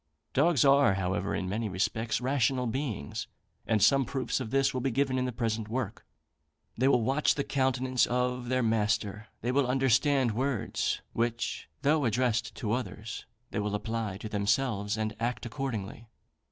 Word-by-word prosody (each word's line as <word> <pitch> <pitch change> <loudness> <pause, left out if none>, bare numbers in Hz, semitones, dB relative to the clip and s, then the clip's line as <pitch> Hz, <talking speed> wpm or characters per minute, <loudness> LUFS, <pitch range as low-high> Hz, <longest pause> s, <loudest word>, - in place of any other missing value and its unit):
Dogs 145 -1 +4
are, 140 -7 +5
however, 95 +1 -1
in 95 - -2
many 105 +3 -2
respects, 110 +4 -1
rational 130 0 +1
beings; 120 - -3 0.4
and 110 -3 +2
some 135 +5 +5
proofs 130 +2 -2
of 125 -4 -4
this 135 +2 +2
will 130 - -2
be 135 - +1
given 130 +1 +1
in 125 - 0
the 125 - -1
present 115 -2 -2
work. 115 -3 -4 0.7
They 130 +3 +2
will 125 -4 +4
watch 135 +5 +2
the 140 - -1
countenance 130 -2 +1
of 125 0 -1
their 130 -1 +2
master 105 -1 0
they 120 - 0
will 135 0 +2
understand 135 0 +3
words, 130 +1 -1
which, 115 0 -2
though 145 0 +3
addressed 120 0 0
to 105 - -3
others, 110 -3 -4 0.2
they - - -2
will 105 0 -1
apply 110 -1 -3
to 110 - -6
themselves, 105 0 0
and 110 0 -2
act 120 +2 -2
accordingly. 115 -3 -4
120 Hz, 165 wpm, -29 LUFS, 110-130 Hz, 0.7 s, are